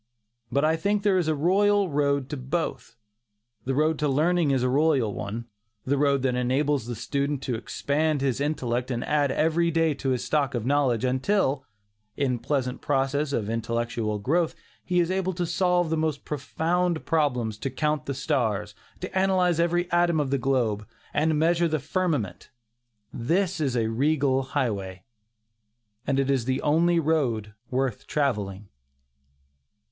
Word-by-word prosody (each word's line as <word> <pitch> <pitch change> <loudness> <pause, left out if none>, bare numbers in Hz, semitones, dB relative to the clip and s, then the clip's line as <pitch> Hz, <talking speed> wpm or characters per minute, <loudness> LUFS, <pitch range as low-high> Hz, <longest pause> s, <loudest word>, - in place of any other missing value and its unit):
But 140 +2 +2
I 160 +1 +2
think 200 +4 0
there 195 -3 +3
is 170 - -1
a 155 - +2
royal 200 +6 +3
road 140 -3 0
to - - -2
both. 135 -3 -3 0.7
The 135 +1 -1
road 155 +2 +2
to 150 - +1
learning 160 +3 +2
is 135 -2 +1
a - - +2
royal 135 -5 +2
one; 110 +4 -5 0.4
the 140 - +1
road 140 -1 +2
that 130 -1 +1
enables 130 +1 0
the 120 - -4
student 140 +4 -2
to 130 - -2
expand 145 +6 -1
his 135 -1 0
intellect 125 -4 -1
and 120 -2 -2
add 145 -2 +1
every 165 +3 +2
day 165 -1 +2
to 140 -1 -3
his 125 -1 0
stock 140 0 0
of 120 -2 -2
knowledge, 130 -3 +2
until, 135 +1 +1 0.5
in 130 -3 +1
the - - -13
pleasant 130 -1 -2
process 140 +1 0
of 110 -7 -1
intellectual 115 -1 -2
growth, 160 +11 0 0.3
he 180 -1 +1
is 175 +1 +1
able 190 0 0
to 175 0 -2
solve 175 -1 +1
the 160 - +1
most 155 -2 -1
profound 165 +4 -1
problems, 125 -9 0
to 135 - -2
count 150 +3 -1
the 140 - -2
stars, 110 -8 -1 0.3
to 185 - -6
analyze 185 -3 +2
every 175 +1 +1
atom 175 -2 +3
of 140 -3 -1
the 140 - +1
globe, 120 -5 0 0.3
and 155 +2 +2
to 155 - +2
measure 170 +2 +2
the 155 -1 0
firmament 155 - -2 0.6
this 175 +9 0
is 135 -4 0
a 115 - +1
regal 135 +3 +1
highway, 100 -9 -3 1.0
and 135 0 +1
it 135 0 +1
is 130 -4 0
the 130 0 0
only 170 +3 +3
road 130 -10 0 0.2
worth 130 -3 -2
travelling. 105 -9 -1
140 Hz, 165 wpm, -26 LUFS, 125-160 Hz, 1.0 s, there